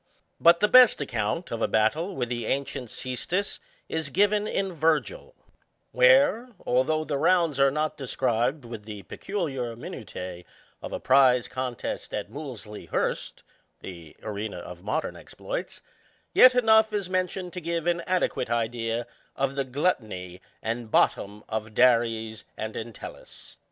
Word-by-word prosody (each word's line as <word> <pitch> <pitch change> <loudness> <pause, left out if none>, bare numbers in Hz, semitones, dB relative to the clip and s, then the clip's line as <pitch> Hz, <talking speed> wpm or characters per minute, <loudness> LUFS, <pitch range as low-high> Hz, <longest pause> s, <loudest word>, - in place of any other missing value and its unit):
But 170 +1 +6
the 210 - +5
best 255 +1 +7
account 125 - -2
of 115 - -3
a - - +2
battle 155 - +1
with 125 -2 -2
the 120 -2 -3
ancient 135 -3 -2
ccestus 170 - -2 0.3
is 160 -3 -2
given 205 +5 +2
in 195 -3 -1
Virgil, 165 - 0 0.6
where, - - +5 0.2
although 150 +5 +2
the 145 -3 -2
rounds 165 -3 +3
are 135 0 +6
not 150 +2 -2
described 130 0 -1
with 115 -3 -8
the 105 -2 -8
peculiar 135 - -4
minu 115 - -8
ti┬╗ 90 -1 -7 0.4
of - - -7
a - - -3
prize 130 -2 +4
contest 130 -2 -4
at 105 0 -5
Movlsey 120 -7 -8
Hurst, - - -2 0.4
(the 85 -4 -10
arena 105 -1 -4
of 90 0 -9
modem 150 +11 -2
exploits,) - - -6 0.5
yet 255 0 +8
enough 220 -2 +5
is 205 -3 -2
mentioned 185 -1 -2
to 180 - -5
give 170 0 -2
an 170 0 +1
adequate 180 -9 0
idea 115 0 -1 0.3
of 135 0 0
the 140 0 -1
gluttony 110 - -2 0.2
and 115 0 -3
bottom 105 0 +1
of 110 -1 -4
Dares 115 -3 +2
and 110 0 -5
Entelltcs. 115 -1 -9
130 Hz, 145 wpm, -26 LUFS, 110-175 Hz, 0.6 s, yet